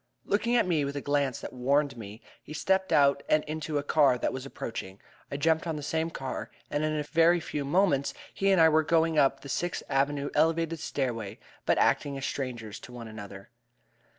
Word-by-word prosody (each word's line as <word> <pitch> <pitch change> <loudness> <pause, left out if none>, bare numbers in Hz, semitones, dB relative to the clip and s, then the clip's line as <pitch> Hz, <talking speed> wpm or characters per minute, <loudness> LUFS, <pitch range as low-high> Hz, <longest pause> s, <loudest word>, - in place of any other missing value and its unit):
Looking 235 +4 +1
at 235 - +4
me 165 -5 +1
with 140 0 -3
a - - -1
glance 140 -3 0
that - - -7
warned 140 +2 +1
me, 110 0 -10 0.2
he 150 - -10
stepped 190 +4 +1
out 140 -1 +4
and 155 0 +3
into 155 0 -3
a 145 - -1
car 145 -4 +4
that - - -1
was 130 +1 -5
approaching. 95 -7 -6 0.3
I 140 - -4
jumped 160 +3 +1
on 160 - -2
the 150 - -6
same 160 +2 -1
car, 135 -5 -5 0.2
and 145 +1 0
in 155 0 0
a 150 - -1
very 165 +3 +4
few 150 -2 -4
moments 145 - +1 0.2
he 195 - +1
and 190 -2 +4
I 160 - +8
were 160 0 +4
going 160 0 +2
up 135 -2 +3
the - - -10
Sixth 175 +6 -2
Avenue 140 +1 0
Elevated 165 +1 +1
stairway, 115 -8 -3 0.3
but - - +3
acting 140 -1 +2
as 135 - -4
strangers 120 -6 -4
to - - -12
one 120 -2 -8
another. 100 -1 -10
145 Hz, 205 wpm, -28 LUFS, 130-160 Hz, 0.3 s, I